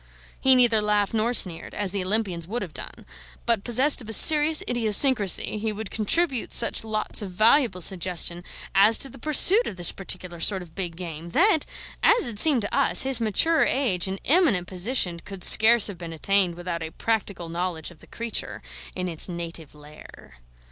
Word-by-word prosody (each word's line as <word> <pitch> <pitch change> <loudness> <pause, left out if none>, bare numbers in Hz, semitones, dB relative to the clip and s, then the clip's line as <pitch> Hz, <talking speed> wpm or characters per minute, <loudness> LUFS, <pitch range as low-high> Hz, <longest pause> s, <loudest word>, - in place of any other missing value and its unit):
He 265 0 +3
neither 235 -4 +3
laughed 210 0 -1
nor 225 +2 -1
sneered, 175 -8 +2
as 205 -3 -3
the 195 -1 -4
Olympians 185 -4 -4
would 235 +5 -5
have - - -11
done; - - -10 0.4
but 230 -4 -1
possessed 255 +4 +2
of 225 - -12
a - - -3
serious 305 - +5
idiosyncrasy, 220 -3 +2
he 220 +1 -4
would 210 -1 -8
contribute 260 +4 -1
such 230 - 0
lots 215 -1 -2
of 200 - -7
valuable 215 +1 +1
suggestion 175 -1 0 0.3
as 210 +3 +4
to 270 - -2
the - - -15
pursuit 360 - +4
of - - -7
this 175 -2 +5
particular 180 -2 -7
sort 190 +1 0
of 165 -2 -18
big 175 -3 -7
game 165 -1 -9
that, 345 -3 +2 0.3
as 470 -5 +3
it 220 -4 -6
seemed 275 -6 +4
to 205 - -4
us, 275 -1 +3
his 265 -2 -1
mature 320 +10 +1
age 210 -10 -1
and 190 +1 -6
eminent 285 - +2
position 185 -1 -3
could 190 0 -11
scarce 225 0 +5
have 195 -5 -2
been 170 -2 -9
attained 185 +1 0
without 175 -1 -6
a 160 - -6
practical 200 -3 -4
knowledge 170 -1 -5
of 165 - -19
the - - -19
creature 230 -1 -7 0.3
in 185 0 -5
its 165 +1 -3
native 170 -3 -9
lair. 150 - -17
205 Hz, 185 wpm, -23 LUFS, 175-240 Hz, 0.4 s, serious